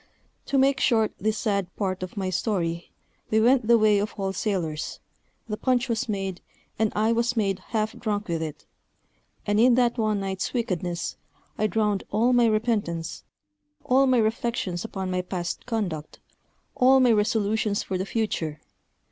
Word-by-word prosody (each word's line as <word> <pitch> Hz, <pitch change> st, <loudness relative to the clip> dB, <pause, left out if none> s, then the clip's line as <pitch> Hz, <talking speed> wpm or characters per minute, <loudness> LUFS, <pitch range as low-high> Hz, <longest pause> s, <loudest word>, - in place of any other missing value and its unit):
To 275 Hz, -, +1 dB
make 270 Hz, 0 st, +3 dB
short 220 Hz, -4 st, +2 dB
this 215 Hz, 0 st, 0 dB
sad 200 Hz, -4 st, 0 dB
part 190 Hz, -3 st, -2 dB
of 185 Hz, +2 st, -6 dB
my 190 Hz, -2 st, -1 dB
story, 170 Hz, -4 st, -1 dB, 0.4 s
we 220 Hz, -, +3 dB
went 240 Hz, 0 st, +4 dB
the 235 Hz, 0 st, +6 dB
way 215 Hz, -2 st, +4 dB
of 210 Hz, +2 st, -3 dB
all 195 Hz, -1 st, -2 dB
sailors; 175 Hz, -7 st, -2 dB, 0.5 s
the 210 Hz, -1 st, -3 dB
punch 255 Hz, +1 st, +1 dB
was 230 Hz, -1 st, -1 dB
made, 195 Hz, -3 st, -3 dB, 0.4 s
and 220 Hz, -1 st, +2 dB
I 220 Hz, +2 st, +2 dB
was 235 Hz, +1 st, +1 dB
made 195 Hz, -3 st, +1 dB
half 215 Hz, -1 st, -1 dB
drunk 210 Hz, -2 st, -2 dB
with 165 Hz, -2 st, -2 dB
it; 155 Hz, -2 st, -6 dB, 0.8 s
and 205 Hz, 0 st, +1 dB
in 240 Hz, +1 st, +6 dB
that 240 Hz, -1 st, +2 dB
one 215 Hz, -2 st, +1 dB
night's 195 Hz, +2 st, -3 dB
wickedness 180 Hz, -7 st, -2 dB, 0.4 s
I 215 Hz, -, +1 dB
drowned 210 Hz, -2 st, 0 dB
all 230 Hz, +5 st, +2 dB
my 240 Hz, -1 st, +5 dB
repentance, 210 Hz, -7 st, -1 dB, 0.6 s
all 265 Hz, +2 st, +4 dB
my 255 Hz, -1 st, +4 dB
reflections 220 Hz, -5 st, -1 dB
upon 190 Hz, -4 st, -4 dB
my 180 Hz, 0 st, 0 dB
past 180 Hz, -1 st, -5 dB
conduct, 185 Hz, -10 st, -3 dB, 0.6 s
all 265 Hz, +1 st, +5 dB
my 250 Hz, -2 st, +5 dB
resolutions 210 Hz, -1 st, +1 dB
for 185 Hz, -1 st, -3 dB
the 190 Hz, -, -1 dB
future. 165 Hz, -10 st, -2 dB
215 Hz, 165 wpm, -25 LUFS, 185-230 Hz, 0.8 s, the